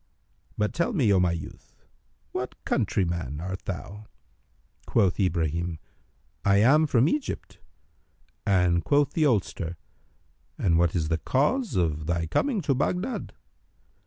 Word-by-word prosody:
But, 105 0 0
tell 170 +8 0
me, 125 - +3
O 95 - +4
my 85 -2 +2
son, 80 - -9 0.7
what - - -4
countryman 85 -6 -1
art 95 +3 -5
thou." 100 +3 -6 0.8
Quoth 100 -4 +2
Ibrahim, 85 -2 0 0.7
"I 100 0 +4
am 145 +9 +5
from 125 -1 +3
Egypt," 295 - -3 0.8
and 90 -3 +2
quoth 145 -1 +2
the 155 -2 +3
oldster, 95 - -1 0.8
"And 85 -3 +2
what 85 0 +2
is 80 -3 0
the 80 -1 0
cause 215 - 0
of 80 -4 0
thy 85 -1 0
coming 215 - 0
to 140 -3 +1
Baghdad?" 180 - -2
95 Hz, 130 wpm, -26 LUFS, 85-140 Hz, 0.8 s, am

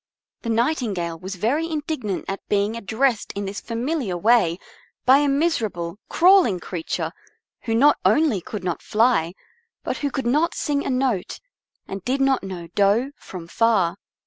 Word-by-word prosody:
The 230 - -5
Nightingale 225 - 0
was 190 +3 -6
very 275 - 0
indignant 295 - -3
at 195 - -3
being 205 +2 +1
addressed 230 +2 0
in 200 0 -4
this 195 +1 -5
familiar 235 - -2
way 195 -4 +3 0.5
by 265 +2 +7
a 290 - +2
miserable, 220 - -1
crawling 350 - +5
creature 170 -1 -4 0.5
who 225 - 0
not 285 +6 +5
only 300 - +3
could 210 -2 -7
not 175 -2 -2
fly, 215 -7 +2 0.5
but - - -2
who 285 - -1
could 270 -1 -4
not 300 +8 +2
sing 285 -1 -1
a - - -3
note, 255 -7 -1 0.5
and 195 -1 -6
did 260 +5 -1
not 270 -1 +2
know 185 -3 -6
do 210 +7 +2
from 175 -3 -10
fa. 205 -4 +2
230 Hz, 155 wpm, -23 LUFS, 195-275 Hz, 0.5 s, by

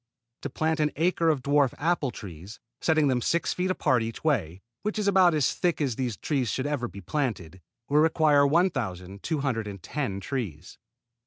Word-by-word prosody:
To 145 - -4
plant 160 +4 -1
an 150 -1 +2
acre 165 +1 +2
to 155 -3 +2
dwarf 140 0 +2
apple 160 -2 0
trees, 100 0 -10 0.2
setting 155 -2 +3
them 125 -2 +1
six 165 +3 0
feet 180 +1 -1
apart 130 -9 +2
each 115 0 -5
way, 95 - 0 0.2
which 210 +1 -3
is 210 -1 0
about 185 -4 +5
as 145 -4 +2
thick 175 -2 0
as 135 -6 0
these 125 -4 -2
trees 135 -6 -1
should 130 +6 -2
ever 145 -4 -1
be 100 +2 -10
planted, 95 - -3 0.3
will 145 +1 +3
require 155 -2 +4
1,210 115 - -2
trees. 100 - -5
140 Hz, 165 wpm, -27 LUFS, 110-160 Hz, 0.3 s, about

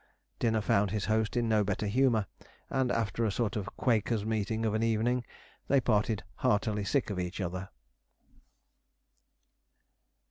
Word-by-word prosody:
Dinner 110 -2 +2
found 100 -1 +2
his 105 +1 -2
host 110 +2 0
in 120 -1 +1
no 110 -2 +3
better 100 +1 -1
humour, 115 0 +2 0.5
and 130 -2 +1
after 115 0 0
a 110 - +1
sort 110 +1 -1
of 105 -1 -3
Quakers' 110 -3 +1
meeting 110 +1 -1
of 110 - +1
an 110 - 0
evening, 115 +2 +1 0.4
they 140 - +4
parted 110 -3 +1
heartily 105 0 +1
sick 125 +2 0
of 95 - -3
each 90 +2 -4
other. 95 0 -4
110 Hz, 145 wpm, -30 LUFS, 105-115 Hz, 0.5 s, they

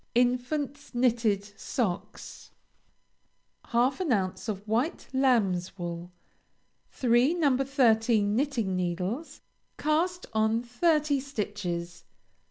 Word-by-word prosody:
INFANT'S 250 +3 0
KNITTED 230 -5 +2 0.2
SOCKS. 205 -8 -4 1.2
Half 245 +6 +1
an 355 -7 -1
ounce 195 +1 -1
of 205 0 -5
White 240 +9 0
Lamb's 210 -10 +2
Wool. 175 0 -5 0.8
Three 250 +5 +3
No. 295 -6 +3
13 225 -6 +2
Knitting 240 -8 0
Needles. 185 - -3 0.4
Cast 345 +4 0
on 220 +2 +2
Thirty 290 +3 +2
stitches. 205 -9 -4
235 Hz, 90 wpm, -28 LUFS, 200-275 Hz, 1.2 s, Three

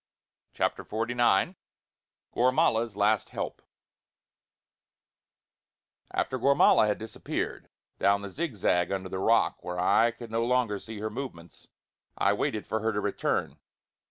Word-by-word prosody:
CHAPTER - - -1
XLIX 120 - +1 0.8
GORMALA'S 120 -3 +2
LAST 105 +1 +2
HELP - - -5 2.5
After 130 - -2
Gormala 140 -4 +5
had 105 - 0
disappeared 110 -1 -5 0.3
down 100 0 +3
the 100 - -6
zigzag 100 - 0
under 95 -1 -3
the 95 - -4
rock, 115 +4 +2
where 90 0 -4
I 110 +6 +4
could 115 0 -10
no 115 +1 0
longer 120 -4 +1
see 110 +1 -9
her 110 0 -3
movements, 105 -9 -8 0.5
I - - +3
waited 110 -2 -2
for 110 - -2
her 110 -1 -1
return. 105 -1 -1
110 Hz, 120 wpm, -28 LUFS, 100-120 Hz, 2.5 s, Gormala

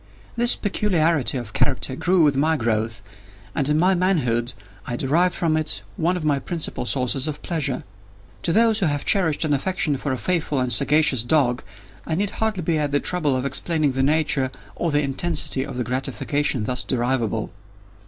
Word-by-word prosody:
This 240 0 +4
peculiarity 170 - +1
of 115 -4 -7
character 130 - 0
grew 175 +4 +2
with 145 -2 +3
my 155 +3 +2
growth, 110 -3 -1 0.5
and 140 0 0
in 150 - +2
my 180 +4 +3
manhood, 130 -10 0 0.3
I 120 - -2
derived 170 +8 +1
from 165 -2 0
it 155 -11 -1
one 175 - 0
of 160 - -5
my 145 -2 +2
principal 160 -6 -3
sources 130 +2 +1
of 150 -1 -4
pleasure. 145 -6 -2 0.6
To 170 - -1
those 225 +2 +3
who 185 - +1
have 145 -1 -2
cherished 170 -6 +2
an 150 - +1
affection 180 0 0
for 140 - -3
a 130 - -1
faithful 160 -3 -1
and 125 -1 +3
sagacious 140 0 +3
dog, 125 -2 +2 0.5
I 160 - -1
need 200 +3 0
hardly 215 -5 -2
be 160 -1 0
at 145 -1 -1
the 145 - +2
trouble 150 -6 0
of 130 +1 -2
explaining 150 +2 0
the 130 +1 -1
nature 140 -2 +1 0.3
or 170 - -1
the 145 -1 +1
intensity 140 -1 0
of 125 - -7
the 125 - -1
gratification 130 +1 -1
thus 125 +3 0
derivable. 120 -3 -1
145 Hz, 185 wpm, -22 LUFS, 130-170 Hz, 0.6 s, This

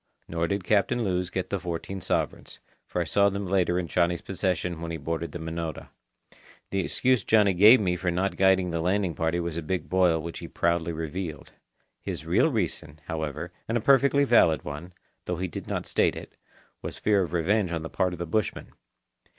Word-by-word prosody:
Nor 85 0 -1
did 100 0 -2
Captain 110 +5 +2
Lewes 90 -3 -1
get 95 0 -4
the 100 - 0
fourteen 90 +2 -5
sovereigns, 90 - -2 0.3
for 90 - -2
I - - +2
saw 100 +4 +3
them 100 0 -4
later 90 -2 +1
in 90 - -1
Johnny's 85 0 +1
possession 90 -3 -2
when 85 - -4
he 85 - -3
boarded 80 +2 -3
the - - -5
Minota. 80 -1 -5 0.8
The 100 - 0
excuse 125 +4 +1
Johnny 105 -3 +4
gave 105 +8 +8
me 90 -4 0
for 90 +1 -1
not 95 +3 0
guiding 95 -2 +3
the 85 -1 -1
landing 95 0 +1
party 80 +2 0
was 85 -1 -3
a - - -2
big 90 +4 -3
boil 90 -3 +3
which 85 +1 -6
he 85 - -7
proudly 85 0 0
revealed. 80 0 -5 0.5
His - - -5
real - - +3
reason, 75 0 -3
however, 80 +1 -4 0.2
and 115 - +1
a - - +1
perfectly 140 +3 +4
valid 85 - +4
one, 75 +5 -7 0.3
though 90 - -2
he 95 +2 -2
did 85 - -7
not - - -3
state - - +1
it, - - -10 0.5
was - - -6
fear 105 -2 +2
of 90 - -2
revenge 90 +3 +1
on 80 -2 -2
the - - -4
part 90 +2 0
of - - -6
the 85 - -3
bushmen. 100 +5 -2
90 Hz, 200 wpm, -27 LUFS, 85-95 Hz, 0.8 s, gave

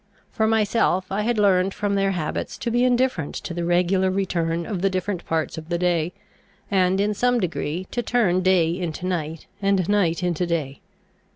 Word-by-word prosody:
For 220 - +1
myself, 215 -4 +2
I 200 +2 0
had 235 +2 0
learned 195 -2 +3
from 205 -1 -1
their 195 0 +2
habits 155 -4 -3
to 235 - -3
be 240 +1 +2
indifferent 250 - +1
to 175 - -5
the 175 0 -3
regular 180 +2 +2
return 170 -3 -1
of 195 -5 -4
the 195 - +3
different 185 -1 -2
parts 160 0 -1
of 160 +1 -13
the 170 - 0
day, 170 -2 +1 0.6
and 190 -1 +2
in 210 +1 +1
some 245 +3 +2
degree 175 -1 -2
to 240 - -1
turn 215 -6 +2
day 180 -3 +3
into 175 -1 -4
night, 165 -3 -3 0.2
and 195 -3 +2
night 185 -4 +1
into 175 0 0
day. 150 -5 -2
185 Hz, 185 wpm, -23 LUFS, 170-205 Hz, 0.6 s, learned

